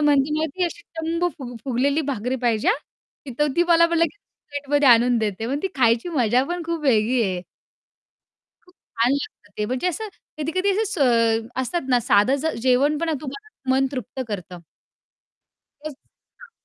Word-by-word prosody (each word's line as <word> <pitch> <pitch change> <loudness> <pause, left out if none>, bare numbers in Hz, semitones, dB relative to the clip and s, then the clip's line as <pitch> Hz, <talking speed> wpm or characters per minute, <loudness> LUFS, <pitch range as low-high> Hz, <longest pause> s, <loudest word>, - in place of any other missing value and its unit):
म्हणते 290 -1 +3
ना 315 - +1
ती 365 - +1
अशी 340 0 -5 0.2
टम्म 335 +2 0
फु 245 -3 -7
फुगलेली 275 +4 +1
भाकरी 250 +1 -2
पाहिजे 225 -3 +1
हां! 280 -1 -5
तर 295 - +3
ती 345 - +5
मला 335 0 +6
मग 340 - -2
लगेच 335 +4 +1 0.3
प्लेटमध्ये 285 -1 +1
आणून 240 +1 +5
देते. 220 0 -2
मग 275 +3 -1
ती 385 - 0
खायची 235 +2 +3
मजा 250 -6 +2
पण 350 0 -2
खूप 335 0 -3
वेगळी 235 -1 +3
आहे. 185 -4 -1 1.2
खूप 360 +1 -24
छान 235 +2 -1
लागतं 280 - -5
ते, 210 - 0
म्हणजे 255 +8 -2
असं 435 +6 -4 0.3
कधी-कधी 370 +6 0
असं 425 +3 +1
स 230 - +2
असतात 265 +1 -3
ना 250 -1 +3
साधं 210 +4 +4
जे 320 - -1
जेवण 280 +4 +3
पण 325 0 -1
तुम्हाला 285 -2 -7
मन 270 +1 +3
तृप्त 260 +1 -5
करतं. 180 -4 -6 1.2
तोच 305 -1 -6 0.5
हां. - - -14
275 Hz, 170 wpm, -23 LUFS, 240-330 Hz, 1.2 s, मला